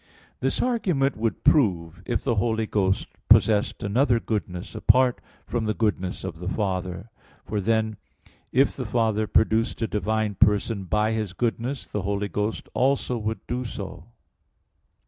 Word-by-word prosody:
4: - - -31 0.3
This - - 0
argument 180 - +1
would 115 0 -2
prove 90 - +2
if 120 - -1
the 125 - +1
Holy 110 +1 +1
Ghost 95 -3 0 0.2
possessed 105 -2 +4
another 120 +4 +2
goodness 100 -4 -4
apart 130 -1 +3 0.2
from 120 -2 -2
the 110 -1 0
goodness 95 -5 -1
of 80 - -6
the 90 +1 -3
Father; 95 0 -3 0.3
for 105 -2 -2
then 110 0 0 0.5
if 135 +2 +3
the 130 -4 -4
Father 110 -1 +1
produced 110 +2 +2
a - - +1
divine 110 0 -1
person 105 0 +2
by 105 +4 +1
His 110 -4 -2
goodness, 120 +4 -2
the 105 - -4
Holy 100 +1 -2
Ghost 105 +3 -2
also 130 -1 +1
would 110 +1 -4
do 125 +1 -2
so. 95 -7 -7
110 Hz, 150 wpm, -25 LUFS, 100-120 Hz, 0.5 s, possessed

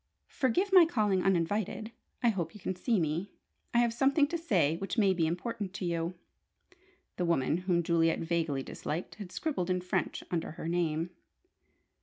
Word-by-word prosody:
"Forgive 360 - +1
my 365 -2 +10
calling 210 - +2
uninvited. 195 +4 0 0.3
I 240 - +5
hope 175 -6 -2
you - - -10
can 190 0 -3
see 220 +3 +1
me. 165 +4 -1 0.4
I - - +1
have 235 -1 +3
something 275 +4 +3
to 340 - -2
say 185 - +2
which 195 +6 -4
may 200 -4 +4
be 165 -3 +1
important 200 +3 -3
to 190 - -4
you," 170 +1 -1 1.0
the 180 - 0
woman, 165 -2 +2
whom 170 -1 +3
Juliet 165 -1 +2
vaguely 165 -5 -1
disliked, 160 +6 -5
had 185 -3 -7
scribbled 235 - -2
in 180 0 +1
French 180 0 -2
under 165 -3 -2
her 160 - -6
name. 170 -1 0
180 Hz, 170 wpm, -31 LUFS, 165-225 Hz, 1.0 s, my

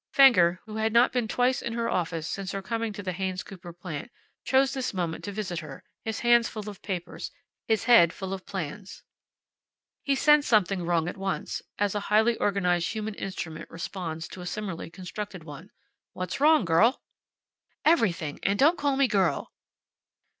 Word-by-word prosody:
Fenger, 185 -11 +6
who 215 -1 -7
had 220 0 0
not 240 +3 +5
been 245 -3 0
twice 250 +3 +1
in 235 - -4
her 230 0 -1
office 165 -2 -1
since 195 +1 -4
her 195 - -3
coming 230 +2 -2
to 205 0 -7
the 185 - -2
Haynes 185 +1 -3
Cooper 185 -3 -10
plant, 175 +4 -7 0.3
chose 265 0 +3
this 255 -6 -3
moment 170 -3 -2
to 205 - -4
visit 190 -5 -3
her, 155 - -10 0.2
his 220 0 -3
hands 240 -1 +4
full 215 -1 -7
of 205 -3 -8
papers, 180 -3 -5 0.4
his 220 -1 +2
head 225 -8 +6
full 190 0 -5
of 190 -1 -6
plans. 190 +1 -6 1.0
He 280 - +1
sensed 295 +1 +4
something 195 -4 +3
wrong 170 -2 +1
at 180 - -5
once, 195 0 -3 0.2
as 205 -1 +1
a 205 - -1
highly 220 +3 +4
organized 180 -4 +1
human 220 -1 -3
instrument 165 -5 -6
responds 165 -1 -5
to 185 - -9
a 180 - -6
similarly 190 -5 -4
constructed 185 +1 -7
one. 155 +5 -10 0.4
"What's 185 +4 -4
wrong, 305 -6 +5
girl?" 190 +11 +3 0.8
"Everything. 185 - +2
And 200 +1 +1
don't 315 +8 +4
call 285 -2 +1
me 275 -1 +4
girl." 195 -6 0
200 Hz, 175 wpm, -27 LUFS, 175-230 Hz, 1.0 s, Fenger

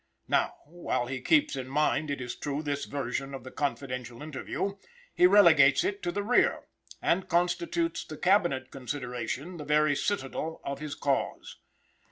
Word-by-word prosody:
Now, - - +1
while 160 -5 -2
he 130 0 -4
keeps 300 - +3
in 130 -1 -5
mind, 150 +2 +1
it 140 - -2
is 125 -1 -5
true, 145 +1 -3
this 145 -1 -2
version 135 0 -3
of 130 - -8
the 130 - -9
confidential 125 -3 -4
interview, 155 +6 -4 0.4
he 180 - +6
relegates 160 -9 +6
it 205 0 -2
to 175 - -1
the 205 +3 -2
rear, 245 +4 +3 0.4
and 185 +2 +1
constitutes 260 - 0
the 155 - -9
Cabinet 175 -8 +2
consideration 130 +4 -4
the 150 - -6
very 150 0 +3
citadel 160 -2 -2
of 140 0 -4
his 150 -1 -5
cause. 140 -1 -2
145 Hz, 160 wpm, -29 LUFS, 135-175 Hz, 0.4 s, he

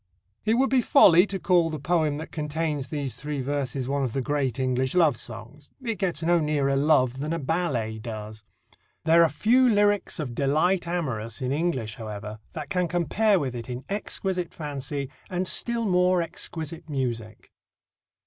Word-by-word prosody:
It 220 +1 +3
would 265 +2 +2
be 260 -2 +4
folly 195 - +6
to 195 - -3
call 175 -3 +3
the 155 - -4
poem 155 -1 +1
that 160 - -7
contains 150 -2 -2
these 145 -4 -3
three 150 -1 -5
verses 135 -1 -2
one 140 0 0
of 125 -4 -2
the 135 - 0
great 135 -2 -1
English 130 +1 0
love 160 -7 +4
songs. 125 +6 -9
It 230 -5 -3
gets 175 -5 -1
no 170 +1 +3
nearer 145 -3 +1
love 135 -3 +3
than 150 +3 -3
a - - 0
ballet 135 -8 -1
does. 110 -1 -7 0.6
There 165 +1 +6
are 165 - +5
few 245 - +3
lyrics 205 -2 +2
of 135 -6 -3
"delight 155 +8 +1
amorous" 120 -11 -3
in 130 0 -2
English, 140 -8 -1
however, 105 -1 -7
that 150 -3 -6
can 180 -1 +1
compare 190 +5 +2
with 135 -5 -2
it 120 0 -7
in 125 +1 -5
exquisite 190 -3 -3
fancy 145 -2 -4 0.2
and 185 0 -1
still 235 +2 0
more 180 -2 +3
exquisite 165 -1 -4
music. 120 -6 -4
150 Hz, 170 wpm, -26 LUFS, 130-175 Hz, 0.6 s, folly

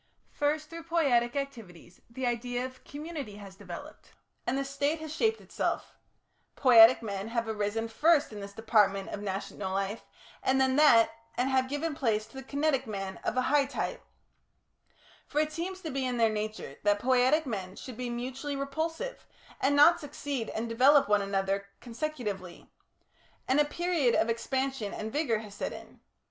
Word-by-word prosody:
First, 305 +2 -1
through 335 0 -8
poietic 270 -8 +2
activities, 225 -12 -7
the 255 +2 -4
idea 245 +1 -1
of 255 0 -8
a - - -24
community 290 -7 -6
has 200 -2 -10
developed, - - -10 0.3
and 265 - +1
the 275 - -1
State 285 +3 -1
has 315 -1 -6
shaped 445 +5 +1
itself; - - -3 0.6
poietic 235 -2 +8
men 200 -1 -4
have 230 0 -2
arisen 220 +1 -1
first 295 +3 +3
in 210 - -7
this 200 0 -7
department 200 -3 +2
of 205 - -5
national 195 -1 -4
life, 195 +3 -2 0.4
and 265 0 +2
then 265 0 +3
that, 240 -7 +6 0.3
and 255 +2 +1
have 260 -1 +2
given 290 +3 -2
place 225 -7 0
to 265 +5 -10
kinetic 280 -1 0
men 195 -2 -4
of - - -3
a 255 - +3
high 290 -1 +5
type 285 - -4 1.2
for 295 - -7
it 305 0 +1
seems 370 +4 -4
to 320 - -5
be 270 0 -2
in 250 -1 -1
their 225 -2 +3
nature 215 0 -4
that 205 0 +3
poietic 255 +6 +3
men 195 -6 -4
should 255 +2 -8
be 250 +1 -4
mutually 260 +4 -4
repulsive, 320 - -4 0.3
and 285 +2 +2
not 295 +4 +7
succeed 285 -5 -4
and 225 +2 -3
develop 265 +5 +5
one 205 0 +3
another 195 0 -1
consecutively 230 - -5 0.8
and 265 +3 +3
a 295 - +5
period 325 -5 +1
of 230 - +2
expansion 260 -1 -2
and 220 +1 -5
vigour 285 -7 +1
has 210 -2 -9
set - - -3
in. - - -11
255 Hz, 170 wpm, -30 LUFS, 215-290 Hz, 1.2 s, poietic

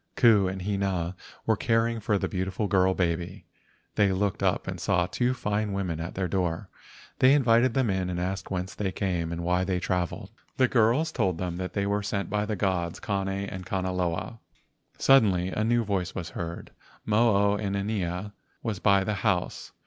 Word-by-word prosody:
Ku 110 -5 +5
and 95 0 -4
Hina 95 -3 -1 0.3
were 110 - +3
caring 115 +1 +1
for 105 -1 0
a - - +1
beautiful 95 +2 -2
girl 95 -2 +3
baby. 85 -1 -2 0.5
They 100 -2 +3
looked 95 0 -1
up - - +1
and - - -5
saw 90 -1 +2
two 125 +7 0
fine 105 -3 -1
women 90 -5 -2
at 85 +2 -5
their 95 -1 -1
door. 85 -2 -2 0.5
They 130 +1 +6
invited 120 -3 +3
them 130 -6 +2
in 95 -1 -1
and 90 -1 -2
asked 95 +2 -3
whence 95 0 -3
they 100 -2 -2
came 90 -3 -2
and 85 0 -4
why 90 +1 +1
they 95 -1 0
travelled. 90 -1 -2 0.3
The 130 - +4
girls 125 +7 +2
told 95 - 0
them 90 -1 -3
they 95 +2 -2
were 100 +1 0
sent 100 -3 -3
by 105 0 0
the 105 - -1
gods 90 -4 -1
Kane 100 -2 -2
and 95 -1 -4
Kanaloa. 90 +3 -2 0.6
Suddenly 100 -9 +4
a 105 - -1
new 120 +1 +2
voice 95 -4 -2
was 90 -2 -4
heard. 85 0 -6 0.3
Mo 110 0 +3 0.2
o - - 0
inanea 100 -1 -2 0.3
was 110 -5 -2
by 100 0 +4
the 105 - -1
house. 95 -5 -1
95 Hz, 180 wpm, -27 LUFS, 90-105 Hz, 0.6 s, They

